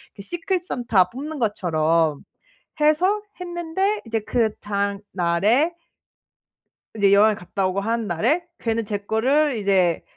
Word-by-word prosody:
그 - - -9
시크릿 350 - -3
산타 230 - +2
뽑는 295 +4 -6
것처럼 165 - +1 0.6
해서 360 +8 +3 0.2
했는데 355 +4 -1
이제 225 0 -1
그 220 0 0
다음날에 200 - 0 1.2
이제 200 -2 +4
여행을 210 +1 +5
갔다 190 +1 -2
오고 190 +2 -1
하는 225 +1 -1
날에 245 - 0
걔는 225 -1 -1
제 205 0 -2
거를 255 +8 +1
이제 190 -4 +2
220 Hz, 255 characters per minute, -22 LUFS, 195-305 Hz, 1.2 s, 여행을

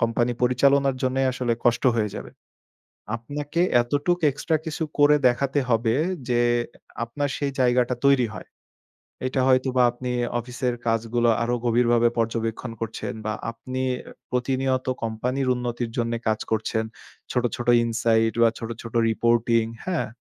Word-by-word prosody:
Company 120 +1 +1
পরিচালনার 135 +2 +3
জন্যই 130 +1 +1
আসলে 125 -2 -1
কষ্ট 120 -1 +2
হয়ে 105 -2 0
যাবে। - - -7 0.9
আপনাকে 145 +7 -3 0.2
এতটুক 145 +8 0
এক্সট্রা 155 +3 -1
কিছু 160 +1 -3 0.2
করে 145 +1 +6
দেখাতে 135 +3 +1
হবে 115 -1 +2 0.4
যে, 120 -1 +3 0.6
আপনার 145 +5 -2
সেই 140 -1 -1
জায়গাটা 125 0 +2
তৈরি 135 -4 +4
হয়। - - -9 0.8
এটা 130 0 0
হয়তোবা 130 -1 +3
আপনি 125 +1 -5 0.3
অফিসের 125 +1 -3
কাজগুলো, 115 +1 +1
আরো 120 +1 0
গভীরভাবে 120 0 +3
পর্যবেক্ষণ 115 +1 -2
করছেন 115 -1 -4
বা 110 - -1 0.2
আপনি 130 +3 -5 0.5
প্রতিনিয়ত 130 +1 0 0.2
কোম্পানির 125 +4 -2
উন্নতির 120 -1 -3
জন্যে 115 -1 0
কাজ 110 0 +1
করছেন। 110 0 0 0.5
ছোট, 125 - 0
ছোট 120 - -6 0.2
ইনসাইড 115 -1 +1
বা 115 - +6
ছোট, 115 - -6
ছোট 115 - -9 0.2
রিপোর্টিং, 115 0 +2 0.2
হ্যাঁ? 185 -3 -1
120 Hz, 135 wpm, -24 LUFS, 115-130 Hz, 0.9 s, করে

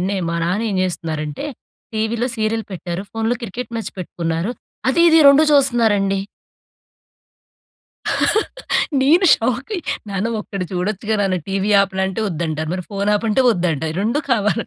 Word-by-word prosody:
నిన్నే 195 +2 -1
మా 170 - -1
నాన్న 195 +7 0
ఏం 195 - -1
చేస్తున్నారంటే, 160 - -3 0.5
టీవీలో 220 +2 0
సీరియల్ 220 0 -1
పెట్టారు. 175 +1 -4
ఫోన్‌లో 225 +2 -1
క్రికెట్ 235 +3 -5
మ్యాచ్ 225 - -4
పెట్టుకున్నారు. 170 +2 -2 0.4
అది 265 +6 +2
ఇది 325 0 +6
రెండు 280 +2 +7
చూస్తున్నారండి. 225 -8 +3 2.8
నేను 335 +8 +5
షాకయ్య. 255 - -2 0.3
నాన్న 200 +3 -1
ఒక్కటి 195 -3 -5
చూడొచ్చుగా 210 +4 -1
నాన్న, 195 -2 +1
టీవీ 195 +2 0
ఆపానా? 190 -1 -1
అంటే 190 +3 -4
ఒద్దంటారు. 160 -2 -3
మరి 180 -2 -4
ఫోన్ 200 +1 -1
ఆపంటే 225 +4 +1
ఒద్దంట. 170 -6 -1 0.2
రెండు 230 +8 +1
కావాలి. 220 0 +1
205 Hz, 130 wpm, -19 LUFS, 180-230 Hz, 2.8 s, రెండు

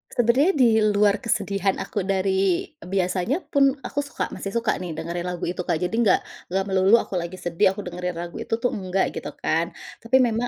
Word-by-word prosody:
Sebenarnya 255 - +3
diluar 215 -5 +4
kesedihan 200 -4 0
aku - - -4
dari 190 -1 +1 0.2
biasanya 185 - -1
pun 275 -3 +4
aku - - -3
suka 285 0 -3
masih 195 +1 -6
suka 235 0 +1
nih 175 -3 -5
dengerin 170 +2 -4
lagu 180 -1 -4
itu 180 - -4
Kak, - - +2
jadi 180 - -1
nggak 225 -1 +3 0.3
enggak 190 +2 0
melulu 190 +2 +5
aku 185 - -3
lagi 170 +1 -5
sedih 175 +1 +1
aku 205 - -6
dengerin 180 0 -4
lagu 170 0 -6
itu - - -5
tuh 240 +2 -1
enggak, 190 -1 -1
gitu - - -5
kan. - - +2 0.3
Tapi 235 +3 0
memang 230 +1 -1
195 Hz, 190 wpm, -24 LUFS, 180-230 Hz, 0.3 s, melulu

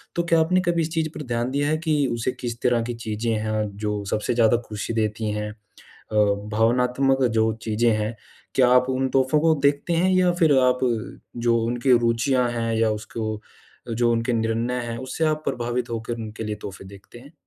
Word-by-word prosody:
तो 170 - +1
क्या 165 -1 +3
आपने 180 +3 +3
कभी 170 -1 +1
इस 160 - -1
चीज़ 160 -1 0
पर - - -5
ध्यान 120 +1 -1
दिया 145 +1 0
है 155 - +1
कि 155 -1 +2 0.2
उसे 120 +2 -1
किस 120 -1 -6
तरह 120 -2 +2
की 120 +1 -4
चीज़ें 110 +2 -2
हैं 110 0 -1
जो 105 -1 -2
सबसे 105 - 0
ज़्यादा 115 0 +4
खुशी 105 +2 -4
देती 110 -1 -1
हैं? 105 0 -3
अ, 105 -1 -22 0.7
भावनात्मक 125 +4 +2
जो 110 0 +3
चीज़ें 115 +1 +1
हैं, 110 +2 -2 0.4
क्या 130 -2 +5
आप 125 +1 +4
उन 130 0 0
तोहफ़ो 130 +3 +2
को 160 +1 +4
देखते 145 +4 +1
हैं 180 +3 +2
या 185 -1 +4
फिर 155 -5 +5
आप 125 -1 +3 0.7
जो 115 0 +4
उनके 120 +1 +3
रुचियाँ 120 +2 +1
हैं 115 -1 -2
या 110 0 +2
उसको 110 +1 -4 0.5
अ, - - -5
जो 120 +1 +2
उनके 115 +1 0
निर्णय 115 +2 -1
हैं, 115 -1 -5
उससे 130 +6 -4
आप 155 0 0
प्रभावित 120 0 -2
होकर 115 0 -3
उनके 110 -1 -6
लिए 105 -1 -3
तोहफ़े 95 0 -8
देखते 100 +4 -13
हैं? 140 +6 -16
120 Hz, 200 wpm, -23 LUFS, 110-135 Hz, 0.7 s, क्या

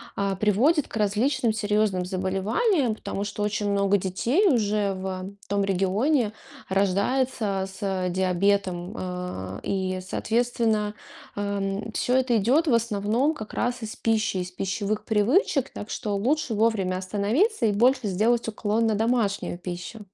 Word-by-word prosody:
а, 200 -1 0
приводит 250 - +3
к - - -6
различным 225 +3 +1
серьезным 210 -3 +1
заболеваниям. 210 - 0
Потому 200 -1 -4
что 205 0 -4
очень 205 0 -1
много 200 0 +3
детей 230 - +1
уже 210 - +2
в 190 +1 -5
том 200 -1 +1
регионе 205 - +1 0.4
рождается 200 +1 +1
с 190 -1 -2
диабетом. 185 +1 0
А, 180 - -5
и, 185 -1 -1
соответственно, 225 +1 0 0.4
а, 200 0 -2
м, 195 +3 -3
всё 250 +3 0
это 255 -3 +3
идет 265 - +3
в 265 - +3
основном 230 +5 +1
как 215 -7 -8
раз 245 -1 -1
из 215 - -6
пищи, 220 -3 +1
из 180 0 -3
пищевых 200 +3 -2
привычек. 255 - +2
Так 210 - -7
что 205 -2 -2
лучше 255 +5 0
вовремя 210 -4 +1
остановиться 215 - +1
и 210 - +2
больше 245 +2 +3
сделать 225 +5 +1
уклон 220 +1 0
на 220 - +1
домашнюю 220 -5 0
пищу. 180 +4 -6
210 Hz, 140 wpm, -25 LUFS, 195-235 Hz, 0.4 s, приводит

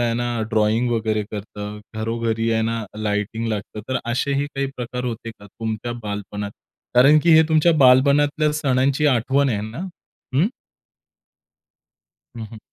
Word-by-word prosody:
आहे 120 -1 +1
ना, 120 -1 -2
ड्रॉइंग 110 +2 +2
वगैरे 110 -2 0
करतं, 105 0 -7 0.2
घरोघरी 115 +1 -1
आहे 110 0 +1
ना 115 0 -2
लाइटिंग 105 +2 -2
लागतं. 105 0 -4
तर 130 -1 0
असेही 140 +3 0
काही 140 0 -1
प्रकार 125 0 -4
होते 115 -1 -4
का 100 -2 -15
तुमच्या 110 +3 -5
बालपणात? 105 0 -5 0.4
कारण 140 +5 +7
की 170 - +5
हे 160 - +8
तुमच्या 160 +1 +4
बालपणातल्या 145 +4 +4
सणांची 140 0 +1
आठवण 135 +2 +2
आहे 105 -5 -1
ना? 110 +3 -7 0.6
हं. 150 +8 +4 1.9
हं, 110 - -5
हं. 110 - -9
115 Hz, 140 wpm, -22 LUFS, 110-135 Hz, 1.9 s, हे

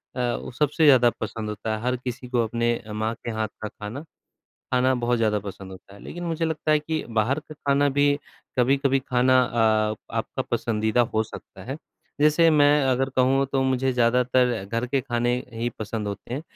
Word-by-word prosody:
अ, - - -4 0.2
वो - - -7
सबसे 150 +5 +1
ज़्यादा 130 -4 +7
पसंद 110 0 -4
होता 105 +1 -3
है, 110 - -6
हर 125 +2 0
किसी 125 0 -6
को 120 -2 +2
अपने 115 +1 -1
माँ 110 +1 -1
के 120 - -2
हाथ 110 0 -2
का 110 - -3
खाना, 105 +6 -7 0.7
खाना 130 +1 +3
बहुत 120 0 0
ज़्यादा 110 -2 +2
पसंद 100 -1 -8
होता 95 +1 -14
है। 100 - -14
लेकिन 175 0 -7
मुझे 165 -1 -1
लगता 160 -1 -1
है 150 - +4
कि 155 +1 -3 0.2
बाहर 125 +7 +2
का 155 - -12
खाना 140 0 +1
भी 145 0 +3 0.4
कभी-कभी 135 +2 +3
खाना 130 +1 +4
अ, 110 -3 +2 0.2
आपका - - -2
पसंदीदा 110 +1 +1
हो 110 - +3
सकता 110 - -11
है। 135 - -3 0.4
जैसे 155 +3 +5
मैं 145 -2 +5 0.2
अगर 130 +1 +1
कहूँ 130 +1 +3
तो 135 -1 +2
मुझे 130 0 +1
ज़्यादातर 125 -2 +2
घर 115 +5 -2
के 135 +2 0
खाने 120 -1 0 0.2
ही 115 +1 -2
पसंद 110 0 -4
होते 100 +4 -6
हैं। 140 - -4
125 Hz, 190 wpm, -24 LUFS, 110-135 Hz, 0.7 s, ज़्यादा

